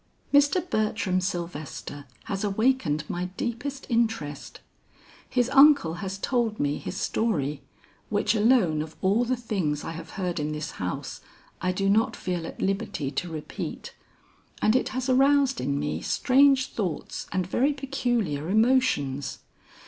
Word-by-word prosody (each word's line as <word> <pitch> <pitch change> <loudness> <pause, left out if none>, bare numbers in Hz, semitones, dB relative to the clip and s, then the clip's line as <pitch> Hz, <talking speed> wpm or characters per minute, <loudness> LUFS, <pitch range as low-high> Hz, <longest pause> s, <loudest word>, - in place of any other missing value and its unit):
"Mr. 290 +5 +4
Bertram 210 - 0
Sylvester 170 -5 -5 0.2
has 195 +1 -3
awakened 200 - +1
my 175 +1 -3
deepest 260 +3 -4
interest. 225 - -1 0.7
His 245 -2 +2
uncle 275 - +6
has 195 -1 -4
told 230 0 0
me 145 0 0
his 190 - -6
story, 150 -12 -1 0.5
which 205 +1 +1
alone 215 -8 +3
of 155 0 -7
all 205 +6 +3
the 255 +2 +1
things 190 -11 -2
I - - -4
have 165 0 -8
heard 180 -3 -2
in 150 +1 -2
this 150 +1 -4
house, 90 -1 -5 0.4
I 185 - +1
do 195 +2 -1
not 215 +3 +3
feel 175 -3 -3
at - - -9
liberty 195 -7 -1
to 170 +5 -3
repeat, 155 -2 -6 0.7
and 215 - +3
it - - +1
has 255 0 -3
aroused 270 0 +3
in 140 +2 -1
me 150 0 -2
strange 270 0 +4
thoughts 185 -8 -4
and 185 -1 0
very 255 +10 +2
peculiar 240 - -1
emotions. 215 - +2
200 Hz, 140 wpm, -26 LUFS, 160-250 Hz, 0.7 s, uncle